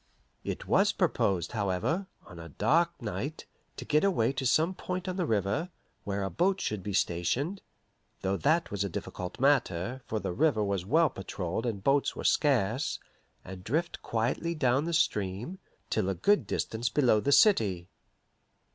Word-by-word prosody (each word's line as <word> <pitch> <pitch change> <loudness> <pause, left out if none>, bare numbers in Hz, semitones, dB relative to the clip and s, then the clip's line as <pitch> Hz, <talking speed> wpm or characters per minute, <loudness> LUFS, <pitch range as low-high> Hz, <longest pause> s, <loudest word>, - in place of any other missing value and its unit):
It - - -4
was - - +3
proposed, 90 -4 0
however, 110 - -1 0.2
on 90 -3 -12
a 85 0 -9
dark 170 - +1
night, 120 - -5 0.3
to - - -6
get 150 +1 +2
away 135 - +2
to 135 -1 -1
some 160 +9 +3
point 180 0 -5
on 185 - -2
the 180 -3 -1
river, 105 - 0 0.4
where 100 0 -2
a 95 - -3
boat 190 +3 +1
should 105 - -2
be 100 - -5
stationed 100 - 0 0.6
though 95 +1 +1
that 155 +10 +1
was 100 -1 -1
a 100 - -2
difficult 90 +1 -6
matter, 130 -4 +1
for 110 - -2
the 90 - -3
river 140 - +2
was 100 -2 -2
well 160 +5 +4
patrolled 95 +3 -4
and 100 -4 -3
boats 140 +3 +2
were - - -6
scarce 130 -2 +1 0.5
and 95 0 -9
drift 160 - -2
quietly 125 +9 -1
down 130 0 +2
the 170 - -2
stream, 105 - -1 0.3
till 95 - +1
a 95 - -1
good 205 - +2
distance 115 +2 -2
below 125 -6 +3
the 140 +6 0
city. 105 - +4
120 Hz, 165 wpm, -29 LUFS, 95-160 Hz, 0.6 s, well